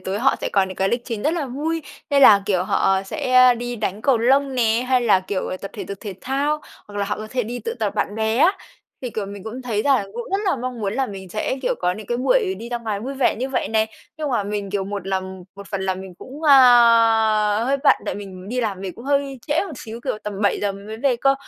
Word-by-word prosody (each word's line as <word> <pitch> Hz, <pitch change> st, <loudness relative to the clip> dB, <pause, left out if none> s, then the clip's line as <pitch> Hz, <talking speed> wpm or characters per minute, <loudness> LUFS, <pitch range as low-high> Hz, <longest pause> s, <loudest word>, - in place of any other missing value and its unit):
tối 190 Hz, +2 st, -3 dB
họ 265 Hz, +4 st, +3 dB
sẽ -, -, -2 dB
có 195 Hz, -, +4 dB
những 190 Hz, 0 st, -8 dB
cái 190 Hz, -, +1 dB
lịch 240 Hz, +4 st, -1 dB
trình 225 Hz, -4 st, -4 dB
rất 315 Hz, +3 st, +1 dB
là 310 Hz, -5 st, -2 dB
vui, 310 Hz, +6 st, -3 dB, 0.3 s
nên 280 Hz, -1 st, +4 dB
là, 205 Hz, -6 st, +8 dB
kiểu, 185 Hz, -3 st, +1 dB
họ 190 Hz, 0 st, +2 dB
sẽ, 195 Hz, +6 st, -4 dB
ơ, 255 Hz, -1 st, +7 dB
đi 240 Hz, +1 st, -5 dB
đánh 210 Hz, -1 st, -3 dB
cầu 265 Hz, -3 st, +3 dB
lông 270 Hz, +3 st, +2 dB
nè, 230 Hz, -1 st, +2 dB
hay 255 Hz, -1 st, +4 dB
là, 215 Hz, -6 st, +4 dB
kiểu, 185 Hz, -1 st, -3 dB
tập 195 Hz, -, -7 dB
thể -, -, -5 dB
dục 200 Hz, -1 st, -6 dB
thể 205 Hz, -4 st, -6 dB
thao, 285 Hz, +3 st, -1 dB, 0.3 s
hoặc 205 Hz, -, -9 dB
là 200 Hz, -, +1 dB
họ 205 Hz, +1 st, -2 dB
có 215 Hz, -, -7 dB
thể 255 Hz, -1 st, 0 dB
đi 240 Hz, +2 st, -5 dB
tụ 460 Hz, -, -4 dB
tập -, -, -1 dB
bạn -, -, -1 dB
bè 220 Hz, +1 st, 0 dB
á. 340 Hz, +7 st, +5 dB, 0.5 s
Thì, 250 Hz, -, -3 dB
kiểu, 215 Hz, -3 st, -4 dB
mình 200 Hz, -1 st, -9 dB
cũng 240 Hz, +4 st, -6 dB
thấy 220 Hz, -4 st, -1 dB
là 270 Hz, -6 st, +3 dB
cũng 240 Hz, 0 st, -4 dB
rất 390 Hz, -, +1 dB
là 375 Hz, -8 st, +1 dB
mong 250 Hz, -1 st, -5 dB
muốn 200 Hz, -1 st, -2 dB
là 265 Hz, +1 st, 0 dB
mình 190 Hz, -3 st, -8 dB
sẽ, 215 Hz, +7 st, -2 dB
kiểu, -, -, +1 dB
có 180 Hz, -, +1 dB
những 210 Hz, +2 st, -9 dB
cái 240 Hz, -, -1 dB
buổi 390 Hz, -, +2 dB
đi 235 Hz, -, -7 dB
ra 240 Hz, 0 st, -2 dB
ngoài 215 Hz, -4 st, -3 dB
vui 265 Hz, +5 st, -5 dB
vẻ 265 Hz, -2 st, +2 dB
như 255 Hz, +4 st, -3 dB
vậy 270 Hz, -, -1 dB
nè, 220 Hz, 0 st, +2 dB, 0.3 s
nhưng 300 Hz, -2 st, -2 dB
mà 240 Hz, -, +1 dB
mình 205 Hz, -1 st, -4 dB
kiểu 200 Hz, -1 st, -1 dB
một 200 Hz, -1 st, -5 dB
là 190 Hz, -1 st, 0 dB, 0.4 s
một 200 Hz, -, -10 dB
phần 195 Hz, -, -2 dB
là 190 Hz, 0 st, 0 dB
mình 190 Hz, -1 st, -9 dB
cũng, 280 Hz, +5 st, -10 dB
a, 230 Hz, -5 st, +5 dB
hơi 275 Hz, +3 st, +1 dB
bận -, -, +6 dB
tại -, -, -2 dB
mình 190 Hz, -2 st, -9 dB
đi 250 Hz, +3 st, -1 dB
làm 205 Hz, -5 st, -2 dB
về 190 Hz, -1 st, -4 dB
cũng 235 Hz, -, -12 dB
hơi 280 Hz, -1 st, 0 dB
trễ 300 Hz, +1 st, +1 dB
một 350 Hz, -, -8 dB
xíu, 225 Hz, 0 st, -8 dB
kiểu, 215 Hz, -, -3 dB
tầm 205 Hz, -1 st, -5 dB
7:00 200 Hz, 0 st, +1 dB
mình 200 Hz, +1 st, -11 dB
mới 220 Hz, +1 st, -6 dB
về 250 Hz, +1 st, +1 dB
cơ, 275 Hz, +3 st, +3 dB
230 Hz, 275 wpm, -22 LUFS, 200-260 Hz, 0.5 s, là